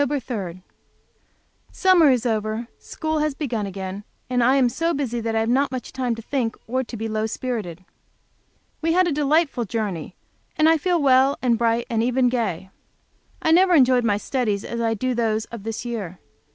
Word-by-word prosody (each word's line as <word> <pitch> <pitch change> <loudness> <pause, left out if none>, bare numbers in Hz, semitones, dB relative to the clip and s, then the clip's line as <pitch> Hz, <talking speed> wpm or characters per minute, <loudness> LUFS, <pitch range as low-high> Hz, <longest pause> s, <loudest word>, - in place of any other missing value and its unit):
3. 225 -11 -3 1.1
Summer 365 -5 +5
is 250 -2 +2
over, 220 0 -1
school 315 -1 -3
has 300 -2 0
begun 235 -9 -3
again, 195 +1 -6 0.3
and 245 -1 +2
I 255 +3 +4
am 265 -3 +4
so 330 +8 -1
busy 250 -4 -2
that 225 0 -2
I 220 - +2
have 225 - -1
not 270 +4 +2
much 255 -1 -6
time 250 -3 -1
to 225 - -9
think, 240 -3 -2 0.3
to 235 - -7
be 225 +1 -3
low 215 0 -1
spirited. 210 -8 -5 1.0
We 330 0 +1
had 365 +1 +4
a - - 0
delightful 290 -3 +1
journey, 195 -6 -4 0.4
and 310 - +4
I 325 0 +4
feel 350 +2 +1
well 270 -1 +4
and 240 -2 +3
bright, 230 +1 +1
and 225 -1 0
even 250 +1 +2
gay. 190 -7 -2 0.7
I 320 - +3
never 360 +1 +5
enjoyed 255 -4 +5
my 205 -3 +2
studies 210 -3 -2
as 235 0 -4
I 225 -1 +1
do 255 +4 -1
those 225 -2 0
of 235 -3 -7
this 225 +3 -5
year. 205 -7 -5
240 Hz, 185 wpm, -23 LUFS, 220-275 Hz, 1.1 s, Summer